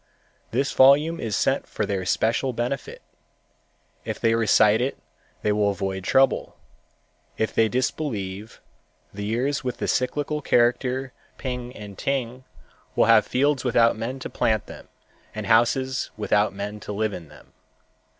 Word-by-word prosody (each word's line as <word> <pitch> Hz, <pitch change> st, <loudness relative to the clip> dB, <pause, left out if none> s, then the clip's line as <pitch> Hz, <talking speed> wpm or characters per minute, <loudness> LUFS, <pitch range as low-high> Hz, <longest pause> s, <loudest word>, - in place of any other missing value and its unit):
This 135 Hz, +4 st, 0 dB
volume 145 Hz, +5 st, +5 dB
is 110 Hz, -3 st, -2 dB
sent -, -, 0 dB
for -, -, -2 dB
their 95 Hz, -2 st, -2 dB
special 120 Hz, +6 st, +1 dB
benefit. 120 Hz, +4 st, -4 dB, 1.0 s
If -, -, -5 dB
they 115 Hz, 0 st, +2 dB
recite 110 Hz, -1 st, +4 dB
it 130 Hz, +2 st, -1 dB, 0.5 s
they 105 Hz, -, +2 dB
will 105 Hz, 0 st, +2 dB
avoid 95 Hz, -1 st, -3 dB
trouble. 135 Hz, +5 st, +2 dB, 0.8 s
If 110 Hz, -, -1 dB
they 110 Hz, -1 st, +3 dB
disbelieve, 110 Hz, -6 st, -3 dB, 0.5 s
the 100 Hz, +1 st, -5 dB
years 130 Hz, +6 st, -1 dB
with 125 Hz, -2 st, -3 dB
the -, -, -3 dB
cyclical 145 Hz, +4 st, -1 dB
character 125 Hz, +1 st, +1 dB, 0.2 s
Ping 125 Hz, -1 st, -5 dB
and 100 Hz, -2 st, -10 dB
Ting 130 Hz, -2 st, -2 dB, 0.5 s
will -, -, +4 dB
have -, -, +5 dB
fields 140 Hz, +1 st, +1 dB
without 115 Hz, -2 st, +3 dB
men 115 Hz, +4 st, -4 dB
to -, -, -5 dB
plant 110 Hz, -2 st, 0 dB
them -, -, -12 dB, 0.5 s
and 110 Hz, -1 st, -4 dB
houses 125 Hz, +4 st, +2 dB
without 105 Hz, 0 st, +2 dB
men 100 Hz, +2 st, -6 dB
to 105 Hz, -, -7 dB
live 105 Hz, 0 st, -1 dB
in 85 Hz, -3 st, -8 dB
them. -, -, -18 dB
115 Hz, 145 wpm, -24 LUFS, 105-130 Hz, 1.0 s, volume